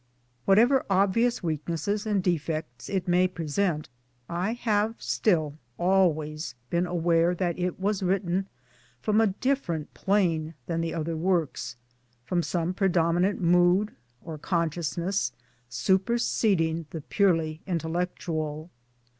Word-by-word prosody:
Whatever 240 Hz, +7 st, +5 dB
obvious 200 Hz, +5 st, +2 dB
weaknesses 170 Hz, +6 st, -2 dB
and 205 Hz, -3 st, +1 dB
defects 155 Hz, -7 st, -2 dB
it 190 Hz, -2 st, -1 dB
may 180 Hz, +1 st, +4 dB
present, 165 Hz, -1 st, -1 dB, 0.4 s
I 180 Hz, +6 st, -1 dB
have 220 Hz, -2 st, 0 dB
still 155 Hz, -7 st, 0 dB, 0.2 s
always 160 Hz, -6 st, +1 dB, 0.2 s
been 175 Hz, +1 st, +1 dB
aware 170 Hz, 0 st, +2 dB
that 175 Hz, -1 st, -1 dB
it 180 Hz, 0 st, -2 dB
was 200 Hz, +1 st, 0 dB
written 190 Hz, 0 st, 0 dB, 0.5 s
from 215 Hz, -, +2 dB
a 225 Hz, -, +4 dB
different 190 Hz, -, -1 dB
plane 165 Hz, -6 st, +1 dB
from 165 Hz, -1 st, -1 dB
the 165 Hz, 0 st, -2 dB
other 165 Hz, 0 st, -2 dB
works, 160 Hz, -8 st, -1 dB, 0.5 s
from 175 Hz, +4 st, +1 dB
some 175 Hz, +1 st, -1 dB
predominant 180 Hz, 0 st, +2 dB
mood 180 Hz, +4 st, +4 dB, 0.3 s
or 160 Hz, -2 st, -6 dB
consciousness 170 Hz, -2 st, -1 dB, 0.4 s
super 190 Hz, -, +1 dB
seding 165 Hz, -9 st, +1 dB
the 160 Hz, -, -6 dB
purely 165 Hz, -3 st, +1 dB
intellectual. 165 Hz, -2 st, -3 dB
175 Hz, 115 wpm, -27 LUFS, 160-195 Hz, 0.5 s, Whatever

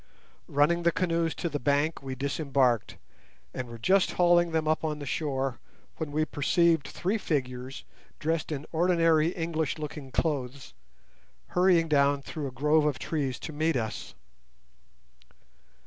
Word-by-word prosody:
Running 150 Hz, +5 st, +2 dB
the 170 Hz, 0 st, +3 dB
canoes 170 Hz, -2 st, 0 dB
to 175 Hz, -, -3 dB
the 150 Hz, -3 st, -3 dB
bank, 145 Hz, +4 st, +1 dB
we 135 Hz, -1 st, -5 dB
disembarked, 135 Hz, -3 st, 0 dB, 0.6 s
and 130 Hz, -1 st, -4 dB
were 115 Hz, 0 st, -9 dB
just 190 Hz, -, +2 dB
hauling 175 Hz, -1 st, +4 dB
them 160 Hz, -1 st, 0 dB
up 155 Hz, +1 st, +1 dB
on 155 Hz, -1 st, -1 dB
to -, -, -10 dB
the -, -, -5 dB
shore, 135 Hz, -4 st, -2 dB, 0.4 s
when 160 Hz, -3 st, -4 dB
we 155 Hz, +1 st, +1 dB
perceived 165 Hz, +1 st, +2 dB
three 200 Hz, +5 st, -2 dB
figures, 130 Hz, -5 st, -3 dB, 0.3 s
dressed 160 Hz, 0 st, -1 dB
in 145 Hz, 0 st, -4 dB
ordinary 165 Hz, -2 st, +3 dB
English 165 Hz, -3 st, -2 dB
looking 150 Hz, -2 st, -6 dB
clothes, 135 Hz, -, -2 dB, 0.8 s
hurrying 180 Hz, -2 st, +3 dB
down 140 Hz, -2 st, +3 dB
through 150 Hz, -1 st, -5 dB
a -, -, -6 dB
grove 150 Hz, +4 st, +2 dB
of 145 Hz, -3 st, 0 dB
trees 140 Hz, -5 st, -2 dB
to 160 Hz, -, -6 dB
meet 155 Hz, +1 st, +1 dB
us. 110 Hz, -, -4 dB
155 Hz, 145 wpm, -28 LUFS, 135-165 Hz, 0.8 s, hauling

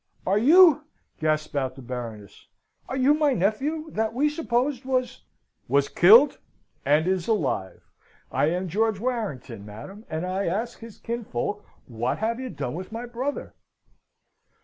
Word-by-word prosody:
"Are 195 Hz, +3 st, +2 dB
you" 310 Hz, -, +6 dB, 0.3 s
gasped 155 Hz, -1 st, -1 dB
out 130 Hz, -2 st, -1 dB
the 135 Hz, -, -11 dB
Baroness 115 Hz, -5 st, -8 dB, 0.4 s
"are 260 Hz, -, -3 dB
you 265 Hz, +3 st, +4 dB
my 300 Hz, -2 st, +2 dB
nephew, 270 Hz, -, -1 dB
that 220 Hz, +1 st, -1 dB
we 295 Hz, +4 st, +2 dB
supposed 270 Hz, -3 st, -1 dB
was 255 Hz, -1 st, -2 dB, 0.2 s
" -, -, -52 dB
"Was 140 Hz, 0 st, +2 dB
killed 230 Hz, +11 st, +6 dB, 0.4 s
and 150 Hz, +3 st, +3 dB
is 185 Hz, -2 st, 0 dB
alive! 135 Hz, -, -1 dB, 0.5 s
I -, -, +2 dB
am 180 Hz, +3 st, -1 dB
George 215 Hz, +3 st, 0 dB
Warrington, 195 Hz, -, -4 dB
madam 110 Hz, -, -10 dB
and 160 Hz, +2 st, -3 dB
I 190 Hz, +2 st, -2 dB
ask 220 Hz, +8 st, -2 dB
his 230 Hz, -2 st, -11 dB
kinsfolk 210 Hz, -, -4 dB, 0.2 s
what 120 Hz, +1 st, -2 dB
have 230 Hz, +2 st, -1 dB
you 260 Hz, -1 st, -5 dB
done 135 Hz, -, -4 dB
with 185 Hz, +5 st, -7 dB
my 230 Hz, +2 st, -5 dB
brother?" 250 Hz, +4 st, -4 dB
210 Hz, 150 wpm, -25 LUFS, 150-255 Hz, 0.5 s, you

